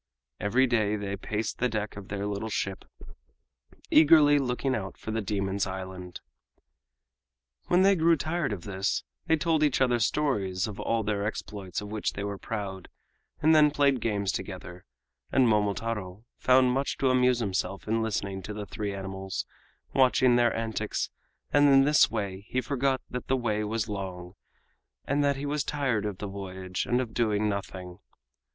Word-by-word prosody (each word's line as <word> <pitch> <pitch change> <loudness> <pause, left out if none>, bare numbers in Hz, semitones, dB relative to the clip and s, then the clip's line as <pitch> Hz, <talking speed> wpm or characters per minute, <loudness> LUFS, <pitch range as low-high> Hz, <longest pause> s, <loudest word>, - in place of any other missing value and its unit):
Every 120 +7 +3
day 110 -4 +1
they 100 -1 -3
paced 105 +2 -3
the 125 - +2
deck 105 -2 -3
of 100 -1 -9
their 100 0 -3
little 105 +2 -3
ship, 95 -2 -3 1.1
eagerly 150 -1 +7
looking 130 0 -1
out 95 -5 -4
for 110 - -6
the 110 +1 -1
demons' 100 -1 -1
island. 95 -1 -7 1.5
When 180 +1 +4
they 195 0 +5
grew 165 -1 +4
tired 160 -1 -1
of 95 -4 -5
this, 95 0 -1 0.2
they 160 - +4
told 160 0 +1
each 150 -3 +2
other 125 -2 +3
stories 105 -7 0
of 105 -2 -7
all 115 -1 0
their 100 -1 -1
exploits 100 -3 -4
of 105 0 -8
which 110 -1 -2
they 100 - -4
were 100 -1 -4
proud, 100 -4 -5 0.5
and 160 +1 +6
then 150 -1 +6
played 140 -4 +2
games 100 -4 0
together; 90 +1 -7 0.5
and 130 -2 +4
Momotaro 105 -1 -1
found 130 0 +5
much 135 +2 -1
to 135 -2 +2
amuse 125 -1 +3
him 105 -5 -1 0.3
in 115 +1 0
listening 100 -3 -2
to 105 +2 -7
the 105 -1 -5
three 100 +2 -4
animals 95 0 -4 0.5
and - - -2
watching 130 -1 +5
their 120 -1 +4
antics, 110 -2 -2 0.4
and 145 0 +6
in 135 -1 +7
this 150 +2 +5
way 100 0 -4
he 130 - 0
forgot 130 +1 0
that 125 - -5
the 130 - +2
way 110 -3 -1
was 110 +1 -2
long 95 -3 -6 0.7
and 145 +1 +1
that 140 0 +2
he 140 +2 -5
was 145 0 -1
tired 130 -8 -1
of 100 -3 -5
the 105 - -5
voyage 95 -2 -5
and 125 - +2
of 115 -3 -5
doing 110 -3 +1
nothing. 95 -3 -5
110 Hz, 170 wpm, -28 LUFS, 100-130 Hz, 1.5 s, eagerly